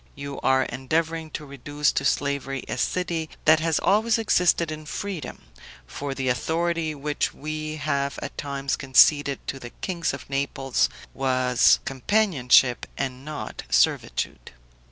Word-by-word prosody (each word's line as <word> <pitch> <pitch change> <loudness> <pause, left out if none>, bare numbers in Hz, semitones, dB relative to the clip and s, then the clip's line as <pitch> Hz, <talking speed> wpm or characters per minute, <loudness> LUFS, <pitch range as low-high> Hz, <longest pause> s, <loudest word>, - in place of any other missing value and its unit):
You 140 0 -6
are 130 0 +3
endeavoring 160 +5 -2
to 150 - -11
reduce 145 +2 -1
to - - -1
slavery 135 -1 -1
a - - -3
city 170 0 -1 0.2
that 155 0 +6
has 160 -1 +1
always 220 +3 +3
existed 180 -6 +2
in 155 0 -7
freedom; 190 -2 -5 0.4
for 140 - -5
the 135 -1 -2
authority 160 +4 0
which 145 +1 -2
we 155 +1 -4
have 140 -2 -1
at - - -7
times 140 -1 -2
conceded 140 +1 +4
to 135 - -4
the 120 - -8
kings 170 +3 -3
of 135 -2 -8
Naples 135 -1 0 0.2
was 130 -2 +3
companionship 135 - +3
and 130 -1 -3
not 150 0 -6
servitude. - - 0
145 Hz, 135 wpm, -25 LUFS, 135-160 Hz, 0.4 s, that